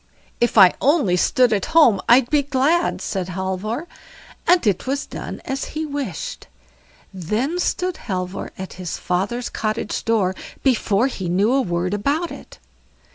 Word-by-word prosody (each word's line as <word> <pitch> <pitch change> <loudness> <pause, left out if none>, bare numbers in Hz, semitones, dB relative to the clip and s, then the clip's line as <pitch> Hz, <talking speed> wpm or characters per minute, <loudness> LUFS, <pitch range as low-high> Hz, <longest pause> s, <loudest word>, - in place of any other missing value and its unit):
"If 240 -1 +1
I 190 -3 +8
only 275 - +3
stood 245 +6 +3
at 200 -3 0
home 230 - +6
I'd 240 +1 +6
be 295 -1 +4
glad", 285 +5 +1
said 185 -3 -3
Halvor; 190 - -3 0.6
and 350 -4 +4
it 205 +3 0
was 280 +2 -1
done - - -7
as 270 +1 -3
he 315 - -1
had 300 -2 -6
wished. 260 - -5 0.7
Then 215 - -2
stood 360 0 -1
Halvor 185 -3 -4
at 190 0 -7
his 175 - -4
father's 200 +7 -2
cottage 215 -1 -3
door 210 -5 +1 0.3
before 230 -4 +2
he 190 -9 -3
knew 200 +7 +2
a 270 - +3
word 175 -2 -1
about 285 - -1
it. - - -11
225 Hz, 155 wpm, -21 LUFS, 190-275 Hz, 0.7 s, I